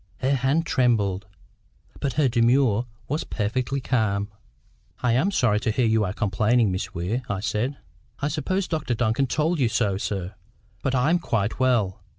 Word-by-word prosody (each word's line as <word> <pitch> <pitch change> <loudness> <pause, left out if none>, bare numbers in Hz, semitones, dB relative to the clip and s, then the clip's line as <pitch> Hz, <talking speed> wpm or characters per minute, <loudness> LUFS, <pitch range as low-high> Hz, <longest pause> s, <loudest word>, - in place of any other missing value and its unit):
Her 135 +2 +2
hand 135 +5 +1
trembled, 105 - +1 0.7
but 135 -3 -1
her 150 -1 +3
demeanour 120 -1 +3 0.2
was 150 +4 -1
perfectly 125 +5 -2
calm. 105 -6 0 0.7
"I 125 - +3
am 135 +11 +2
sorry 120 - +2
to 110 - -1
hear 120 +3 +1
you 110 -1 +3
are 90 - -2
complaining, 105 +2 +2
Miss 95 +1 -4
Weir," 95 +9 -1
I 95 - -1
said. 110 +7 -1 0.4
"I 140 - 0
suppose 180 +6 -1
Dr 155 -7 -1
Duncan 120 +3 +1
told 155 +5 0
you 125 -4 +3
so, 105 -4 +1
sir. 95 -2 -3 0.5
But 135 -1 0
I 130 +5 +2
am 175 - +3
quite 110 - -1
well. 120 -8 +1
120 Hz, 165 wpm, -24 LUFS, 105-135 Hz, 0.7 s, her